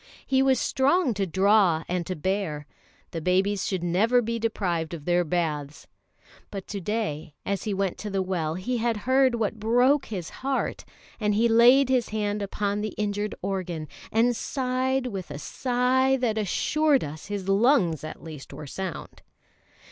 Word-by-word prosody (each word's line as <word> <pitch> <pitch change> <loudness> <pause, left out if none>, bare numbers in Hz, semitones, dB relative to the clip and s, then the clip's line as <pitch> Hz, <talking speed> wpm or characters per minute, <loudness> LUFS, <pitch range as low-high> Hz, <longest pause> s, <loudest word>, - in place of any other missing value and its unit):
He 265 0 +2
was 265 -2 +3
strong 275 +1 +2
to 195 -1 -1
draw 190 -2 +3
and 175 -1 -2
to 185 - -2
bear. 170 -3 -2 0.5
The 165 - -4
babies 190 +3 +1
should 185 -3 -2
never 205 +8 +3
be 230 0 -2
deprived 175 -7 -1
of 150 -3 -11
their 175 0 +3
baths! 150 -3 -2 0.6
But 195 -2 -6
to 200 -2 -4
day 165 -7 -3
as 200 +2 -2
he 210 - -1
went 195 -2 -1
to 210 - -5
the 195 -1 0
well 165 -4 -2
he 240 +8 -2
had 230 -1 0
heard 260 -1 +4
what 225 -1 -2
broke 245 +6 +3
his 185 -7 -5
heart; 270 0 -2 0.3
and 210 -2 +1
he 230 +3 +4
laid 240 +4 +6
his 255 -3 +2
hand 210 -1 -1
upon 205 +1 -2
the 215 - -4
injured 210 0 -2
organ, 180 -5 -3 0.2
and 235 +2 +3
sighed 260 +1 -1
with 195 -9 -5
a 145 - -6
sigh 255 - +1
that 230 -4 0
assured 290 +8 +2
us 150 +1 -7
his 200 -2 -4
lungs 195 - +3
at 155 - -8
least 155 -4 -9
were 150 - -8
sound. 185 +3 -6
205 Hz, 170 wpm, -26 LUFS, 180-245 Hz, 0.6 s, laid